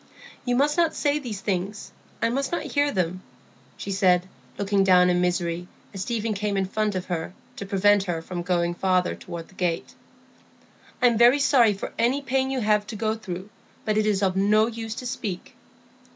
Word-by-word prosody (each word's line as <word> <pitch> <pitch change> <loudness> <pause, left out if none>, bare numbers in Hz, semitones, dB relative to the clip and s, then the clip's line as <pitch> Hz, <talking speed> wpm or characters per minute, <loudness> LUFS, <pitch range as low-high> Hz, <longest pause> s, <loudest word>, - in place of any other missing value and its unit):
"You 245 -1 +1
must 290 +4 +2
not 335 -2 +2
say 290 0 +1
these 225 -8 -6
things; 200 0 -3 0.3
I 230 - +3
must 270 +3 -1
not 345 - -1
hear 285 0 +1
them," 185 -2 -1 0.6
she 200 - -5
said, 185 -2 +3 0.3
looking 200 -1 +2
down 180 -1 +5
in 180 0 +2
misery, 175 -1 -1 0.3
as 195 - -5
Stephen 225 +1 -1
came 205 0 -2
in 195 - +1
front 210 +1 -1
of 185 0 -3
her, 175 -1 -4 0.2
to 200 - -6
prevent 200 0 +3
her 175 -3 -2
from 175 +2 -5
going 175 -1 0
farther 185 0 +1
toward 165 -1 -8
the - - -19
gate. 175 -2 -2 1.1
"I'm 235 -3 +4
very 240 +3 +7
sorry 245 -7 +4
for 195 - -6
any 255 +5 +2
pain 265 0 0
you 265 -1 -1
have 210 -1 +2
to 220 - -6
go 215 +1 0
through; 200 -2 -7 0.3
but 215 - +1
it 215 0 +2
is 205 -2 +1
of 190 -1 +1
no 210 +3 +4
use 225 -1 -5
to 250 - -7
speak." 205 -6 -5
205 Hz, 195 wpm, -25 LUFS, 185-230 Hz, 1.1 s, very